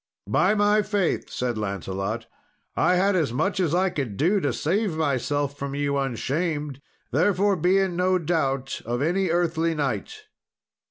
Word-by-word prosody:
"By 195 +4 +3
my 205 +1 +4
faith," 205 -4 -1
said 120 -3 -2
Lancelot, 100 +2 -3 0.5
"I 180 - +3
had 195 +2 +3
as 160 -9 +1
much 190 +11 0
as 170 -3 +1
I 185 +1 +2
could 125 -11 -4
do 185 +7 +3
to 145 -7 0
save 170 - -1
myself 145 -1 -1
from 140 0 -4
you 145 0 0
unshamed, 140 +2 -2 0.3
therefore 195 - +2
be 180 +3 +2
in 190 -2 +1
no 185 +1 +3
doubt 140 -6 -1
of 120 +3 -2
any 180 +4 +1
earthly 165 -1 +1
knight." 150 - -3
160 Hz, 155 wpm, -25 LUFS, 135-185 Hz, 0.5 s, my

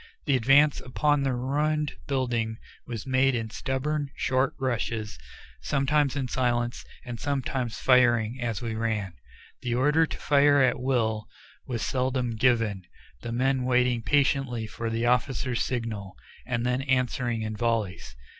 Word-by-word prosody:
The 140 - +3
advance 135 +4 +4
upon 145 +3 +1
the 135 -2 0
ruined 150 +4 0
building 120 -5 -1 0.3
was 115 -4 -5
made 130 0 +2
in 115 -2 -3
stubborn, 140 +4 -2
short 130 +1 0
rushes, 115 -4 -2 0.4
sometimes 140 0 +1
in 135 -3 -1
silence, 120 -1 -1 0.2
and 120 -2 -6
sometimes 130 -4 -2
firing 120 -2 +3
as 115 -3 -2
we 115 -1 -2
ran. 110 -4 -2 0.5
The 120 -1 -1
order 150 +5 +3
to - - -6
fire 145 -1 +4
at 130 -2 +3
will 115 -4 0 0.4
was 120 -3 -2
seldom 130 -1 0
given, 115 -4 +1 0.4
the 115 - -5
men 130 +2 +1
waiting 125 -1 +2
patiently 135 -3 +1
for 115 +1 -5
the 115 +1 -1
officers' 125 0 +1
signal, 110 -6 -3 0.3
and 120 -2 -1
then 125 +1 +1
answering 125 -3 0
in 110 0 -4
volleys. 105 - -2
125 Hz, 140 wpm, -27 LUFS, 115-135 Hz, 0.5 s, advance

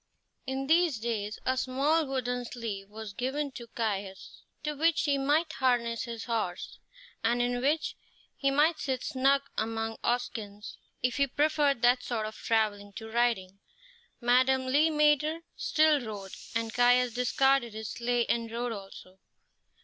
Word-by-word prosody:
In 265 +1 -2
these 325 -2 +3
days 215 -2 -3
a 260 - +2
small 280 +5 +1
wooden 250 -2 -2
sleigh 225 -5 -5
was 210 0 -9
given 270 +5 -2
to 240 -2 -9
Caius, 200 -4 -4 0.2
to 300 - -1
which 325 +3 +2
he 285 -2 +1
might 310 +4 +1
harness 240 -4 +1
his 230 -2 -6
horse, 220 -7 -3 0.4
and 235 +2 +2
in 245 0 0
which 300 +4 0 0.4
he 275 - +1
might 300 +3 +3
sit 260 -2 -2
snug 275 0 +2 0.2
among 225 0 -2
oxskins 220 -4 -3 0.3
if 250 +1 +1
he 280 0 +3
preferred 290 -2 +1
that 245 +1 +5
sort 225 -4 -2
of 215 0 -6
travelling 205 -3 0
to 220 +2 -8
riding. 220 -5 0 0.6
Madame 260 +2 +3
Le 290 +5 +3
Maître 300 +1 +2
still 310 -3 +3
rode, 205 -4 -7 0.2
and 225 -1 -1
Caius 245 0 +4
discarded 250 -1 +2
his 220 -1 -5
sleigh 240 0 0
and 230 -1 -1
rode 240 +1 -2
also. 195 -2 -10
245 Hz, 150 wpm, -29 LUFS, 225-275 Hz, 0.6 s, that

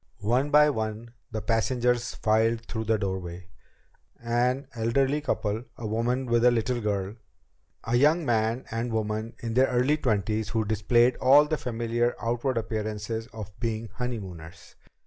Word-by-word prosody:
One 125 +7 +1
by 150 0 +6
one 110 -1 -4 0.2
the 110 -1 -4
passengers 120 +1 0
filed 115 +1 +1
through 110 -1 -4
the 110 0 +2
doorway. 95 -3 -5 0.7
An 120 +3 0
elderly 130 +5 +1
couple. 110 -4 -2
A 115 - -7
woman 120 +4 0
with 120 -1 +2
a 125 - +7
little 120 +1 0
girl. 100 0 -2 0.7
A 115 - -1
young 155 +5 +3
man 115 0 0
and 115 +2 -2
woman 110 +1 -2
in 115 -1 -2
their 130 +3 +4
early 125 +5 +2
twenties 110 -3 0
who 110 -1 0
displayed 120 +4 +3
all 140 +3 +6
the 155 +1 -1
familiar 120 -1 -1
outward 120 +2 -1
appearances 110 0 -3
of 105 -2 -8
being 115 -1 -3
honeymooners. 95 -10 -7
115 Hz, 145 wpm, -27 LUFS, 110-125 Hz, 0.7 s, a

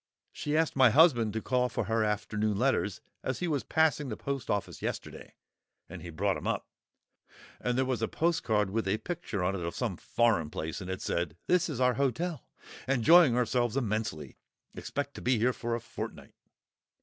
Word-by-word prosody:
She 150 +1 -2
asked 160 -1 +1
my 130 -2 +7
husband 120 -5 +5
to 110 - -3
call 125 -1 +1
for 125 - -2
her 110 +2 +1
afternoon 105 0 -1
letters 110 -5 +1 0.2
as 130 - -2
he 180 - -2
was 145 -5 0
passing 155 -3 +1
the 110 - -4
post 140 -3 -4
office 100 -1 -2
yesterday, - - -6 0.5
and - - -9
he 85 - -8
brought 95 +4 0
'em - - -6
up, - - -1 0.9
and 125 0 -1
there 130 - +2
was 130 -3 -1
a 110 - +1
postcard 110 - +1
with 110 -1 -1
a 100 +3 +1
picture 165 - -4
on 95 +2 +1
it 95 - -4
of 85 0 -4
some 115 -8 -2
foreign 110 -10 +1
place, 80 +4 -5
and 90 - -7
it 95 - -4
said, 85 -1 -2
'This 180 0 +2
is 140 -6 -4
our 125 -1 +4
hotel; 145 +6 -2 0.4
enjoying 135 +1 +6
ourselves 120 0 +1
immensely; 110 - -3 0.3
expect 145 -1 -4
to - - -9
be 125 -1 +2
here 115 +4 +3
a 120 -1 -3
fortnight. 120 - -8
120 Hz, 185 wpm, -30 LUFS, 105-140 Hz, 0.9 s, my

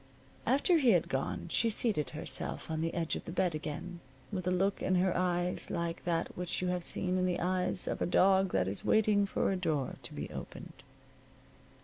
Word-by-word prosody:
After 285 +7 +4
he 250 -6 +5
had 175 - +2
gone 135 0 -2
she 230 +7 +2
seated 210 -8 +1
herself 155 +1 -3
on 160 0 -1
the 165 0 -2
edge 165 -2 0
of - - -6
the - - -6
bed 180 -1 +1
again, 155 +3 -5 0.3
with 185 -3 -3
a - - +4
look 195 +2 +1
in 185 - +1
her 180 0 +2
eyes 180 0 0
like 170 -1 -3
that 170 -1 -1
which 180 -1 -3
you 180 - -1
have 180 -1 -1
seen 185 +1 -1
in 185 - +2
the 180 - 0
eyes 185 0 0
of - - -2
a - - +1
dog 190 +1 +4
that 90 0 +1
is 100 +1 -2
waiting 210 -2 +3
for 195 - 0
a - - +1
door 155 -8 -1
to - - -7
be - - -4
opened. - - -9
180 Hz, 210 wpm, -32 LUFS, 165-190 Hz, 0.3 s, he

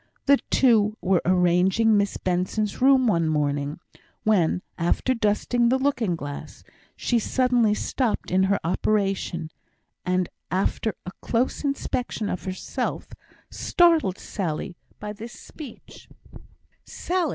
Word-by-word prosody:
The 280 0 +5
two 220 -4 +3
were 185 -2 +2
arranging 185 +5 +3
Miss 200 -1 +1
Benson's 185 +4 -1
room 265 -1 +5
one 170 -8 +2
morning, 145 0 -1 0.4
when, 185 -4 +2
after 175 +9 +1
dusting 235 +2 +1
the 260 - +3
looking 255 -9 0
glass, 145 -3 -8 0.3
she 240 - +1
suddenly 245 -2 +2
stopped 240 -3 -2
in 185 +1 +3
her 200 +1 +1
operation, 185 -2 -1 0.5
and 180 -1 0 0.2
after 195 +4 -1
a 180 - -5
close 245 +5 -1
inspection 250 -6 -2
of 180 - -4
herself, 185 0 -4 0.4
startled 330 - +3
Sally 175 -2 -4 0.2
by 210 0 -5
this 230 +3 -9
speech: 280 -2 -12 0.7
"Sally! 355 -3 -2
205 Hz, 120 wpm, -24 LUFS, 180-245 Hz, 0.7 s, The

